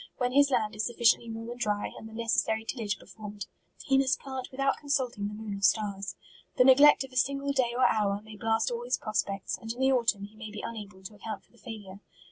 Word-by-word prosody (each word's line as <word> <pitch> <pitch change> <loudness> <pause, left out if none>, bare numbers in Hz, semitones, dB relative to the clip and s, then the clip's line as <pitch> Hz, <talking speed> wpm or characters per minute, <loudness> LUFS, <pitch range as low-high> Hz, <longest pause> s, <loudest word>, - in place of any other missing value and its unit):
When 250 -1 0
his 285 +2 +5
land 230 -5 +1
is 210 - -2
sufficiently 235 -1 +3
warm 225 +1 -6
and 245 - -8
dry, 210 -2 -1
and 220 - -9
the - - -13
neces 230 0 +1
sary 220 0 -2
tillagp 215 -5 -2
performed, 205 +1 -9 0.4
he 270 -1 +3
must 270 0 +2
plant 265 -2 -6
with 260 - -12
out 275 0 +2
consulting 260 -8 -1
the 210 - -6
moon 215 -1 -5
or 200 - -7
stars. 200 -1 +1 0.4
The 250 - +7
ne 260 +1 +9
glect 290 +1 +7
of 270 - -10
a - - -14
single 280 +2 +1
day 245 -3 +1
or 255 - +4
hour, 200 -2 +2
may 215 0 -11
blast 225 +2 +1
all 235 0 -3
his 245 +1 0
prospects, 200 -2 -2
and 225 - -5
in 240 - -8
the 265 0 +4
autumn 230 -5 +2
he 205 +2 -10
may 215 0 -8
be 210 0 -7
unable 205 -4 -8
to 190 - -8
account 215 +1 -7
for - - -33
the 235 - -23
failure. 205 -5 -9
225 Hz, 250 wpm, -29 LUFS, 210-255 Hz, 0.4 s, ne